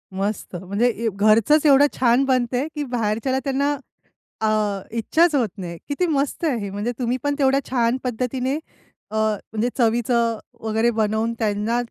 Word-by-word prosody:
मस्त 195 0 -3
म्हणजे 200 +7 0
ए 230 -1 -1
घरचंच 220 +9 +4
एवढं 285 -1 +7
छान 245 +1 +4
बनतंय 255 +1 +1
की 295 - -2
बाहेरच्याला 230 +3 0
त्यांना 280 +1 0 0.7
अ, 220 - +2 0.5
इच्छाच 315 +8 +3
होत 245 -6 +2
नाही. 175 -3 -6
किती 290 +5 0
मस्त 290 0 -1
आहे 285 -6 +1
हे, 200 -1 -4
म्हणजे 205 +4 -3
तुम्ही 245 0 0
पण 285 0 0
तेवढ्या 270 0 +3
छान 240 -1 +1
पद्धतीने 250 +2 -1 0.6
अ, - - -5
म्हणजे 220 +1 -1
चवीचं 235 -1 +2 0.2
वगैरे 225 +1 +1
बनवून 220 +1 0
त्यांना 215 +1 0
235 Hz, 150 wpm, -22 LUFS, 220-265 Hz, 0.7 s, एवढं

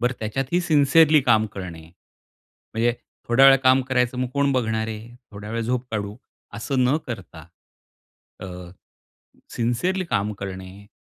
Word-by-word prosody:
बरं 125 +2 +1
त्याच्यातही 135 +10 -1
सिन्सीयरली 155 -1 +4
काम 110 -3 +3
करणे. 90 -4 -7 0.9
म्हणजे, 115 +1 +1 0.3
थोड्या 130 +3 +6
वेळ 135 0 +8
काम 130 +1 +5
करायचं 125 -1 0
मग 130 - -1
कोण 140 0 +2
बघणार 110 -3 0
आहे? 110 +2 -8 0.2
थोड्या 105 +1 -8
वेळ 115 +1 -2
झोप 125 +2 -2
काढू, 105 -1 -4 0.4
असं 130 +3 -1
न 135 +5 +3
करता, 90 -9 -8 0.9
अ, 95 - -6 1.1
सिन्सीयरली 150 +12 0
काम 105 -9 -1
करणे 95 +1 -8
120 Hz, 135 wpm, -23 LUFS, 105-135 Hz, 1.1 s, वेळ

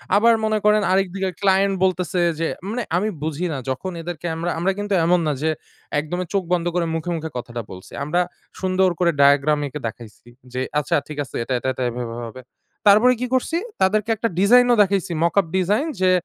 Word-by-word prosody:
আবার 230 +3 +5
মনে 215 0 +1
করেন 210 0 +5
আরেকদিকে 190 0 0
ক্লায়েন্ট 195 0 +3
বলতেসে 180 -1 +1 0.2
যে 165 - 0 0.2
মানে 235 +1 -2
আমি 210 +4 0
বুঝি 160 +3 -2
না 140 - -3
যখন 160 +8 -3
এদেরকে 170 -1 -5
আমরা 170 +2 -2
আমরা 190 +3 +1
কিন্তু 205 -1 -2
এমন 180 +1 +4
না 150 - +2
যে 160 - +2 0.5
একদমই 175 +4 -4
চোখ 195 -2 +1
বন্ধ 175 -1 +1
করে 175 -1 +1
মুখে, 165 +2 -3
মুখে 160 0 -4
কথাটা 120 -1 -5
বলছি। 95 0 -11
আমরা 175 +5 +1 0.4
সুন্দর 185 0 +2
করে 170 -1 +3
diagram 145 +1 +4
এঁকে 150 +2 -6
দেখাইছি। 110 0 -11 0.3
যে 130 - -2 0.2
"আচ্ছা 145 - 0
ঠিক 150 -1 -8
আছে, 125 - -12
এটা, 130 - -3
এটা, 130 - -4
এটা 130 - -3
এভাবে 120 -1 -5
হবে।" 130 +3 -11 0.5
তারপরে 220 +5 +6
কী 250 - -1
করছি? 290 +6 +1 0.2
তাদেরকে 210 +3 +2
একটা 225 +2 -1
ডিজাইনও 245 +5 +6
দেখাইসি 195 -2 +1
mockup 180 +2 +3
ডিজাইন। 210 - +1
যে 185 -1 +4
180 Hz, 190 wpm, -22 LUFS, 150-200 Hz, 0.5 s, তারপরে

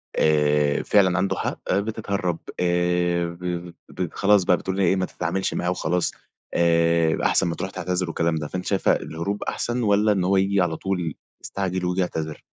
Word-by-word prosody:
آآ، 75 -1 +2
فعلًا 95 -3 +3
عنده 95 +2 +1
حق - - -3
آآ، 95 - +3
بتتهرب 100 -5 -2 0.2
آآ، 90 0 +1
ب 85 0 -5 0.2
ب 90 -3 -4
خلاص 100 -1 +4
بقى 90 0 +3
بتقول 95 - -4
إن 100 - 0
هي 95 - +3
إيه - - +3
ما 95 -1 0
تتعاملش 90 +2 -2
معاه 90 - -1
وخلاص 90 0 0 0.4
آآ، 85 -1 +3
أحسن - - +3
ما 85 - -2
تروح 95 +2 -4
تعتذر 90 +1 -2
والكلام 85 0 0
ده 75 -1 -3
فأنتِ 90 +4 -5
شايفة 100 -2 +2
الهروب 85 +6 -4
أحسن 120 +1 -2
والّا 105 0 +3
إن 95 -3 +1
هو 95 +2 +2
ييجي 95 0 +2
على 85 -2 0
طول 90 -5 -2 0.3
يستعجل 95 -2 -3
وييجي 90 +1 0
يعتذر؟ 80 -3 -3
90 Hz, 185 wpm, -24 LUFS, 85-95 Hz, 0.4 s, خلاص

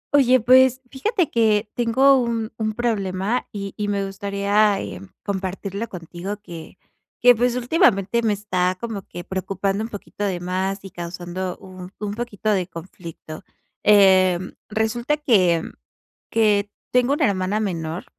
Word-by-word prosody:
Oye, 255 -2 +5
pues, 255 +2 +5
fíjate 355 - 0
que 215 -2 +2
tengo 260 +3 +4
un 230 -2 -2
un 215 0 -1
problema, 210 -1 -1
y 200 -1 -6
y 210 - -2
me 200 -1 -1
gustaría, 200 +1 +1
eh, 95 -3 -6 0.2
compartirlo 195 +2 -4
contigo, 180 +3 -6
que 170 -6 -11 0.4
que, 245 0 +7
pues, 245 +1 +1
últimamente 235 - +2
me 220 -2 +1
está 185 -3 -1
como 225 -3 -4
que 175 - -8
preocupando 195 +2 -2
un 225 - -5
poquito 205 -1 -7
de 190 -3 -1
más, 190 +2 -2
y 195 - -9
causando 175 +1 -5
un 185 -1 -11
un 205 -1 -3
poquito 215 -2 -2
de 185 -4 0
conflicto. 165 -2 -10 0.4
Eh, 190 -3 +6 0.3
resulta 230 +6 0
que 185 - +3 0.7
que 210 -2 +2 0.2
tengo 250 +2 +3
una - - +2
hermana 195 +1 0
menor, 170 -5 -3
205 Hz, 140 wpm, -22 LUFS, 185-230 Hz, 0.7 s, que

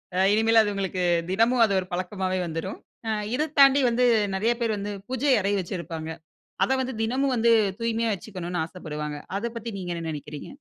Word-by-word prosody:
அ - - +1
இனிமேல் 225 +1 +5
அது 205 -1 -1
உங்களுக்கு, 190 -2 -2 0.3
தினமும் 230 +4 +4
அது 200 - -1
ஒரு 180 - -5
பழக்கமாவே 185 0 -2
வந்துரும். 165 +3 -5 0.3
அ - - +1 0.2
இதை 305 +3 0
தாண்டி 275 0 +7
வந்து 245 +2 +2 0.3
நெறைய 225 +5 +2
பேர் 225 -2 +1
வந்து 205 +1 -4
பூஜை 260 +2 +1
அறை 200 +1 0
வச்சிருப்பாங்க. 165 -3 -5 0.5
அத - - +1
வந்து 260 0 -3
தினமும் 265 +4 +1
வந்து, 235 0 +3 0.3
தூய்மையா 230 0 0
வச்சுக்கணும்ன்னு 180 -3 -4
ஆசப்படுவாங்க. 150 -4 -6 0.2
அதை 235 +3 -2
பத்தி 230 0 -5
நீங்க 175 -1 -4
என்ன 165 - -5
நெனைக்கிறீங்க? 150 -1 -7
205 Hz, 175 wpm, -25 LUFS, 180-230 Hz, 0.5 s, தாண்டி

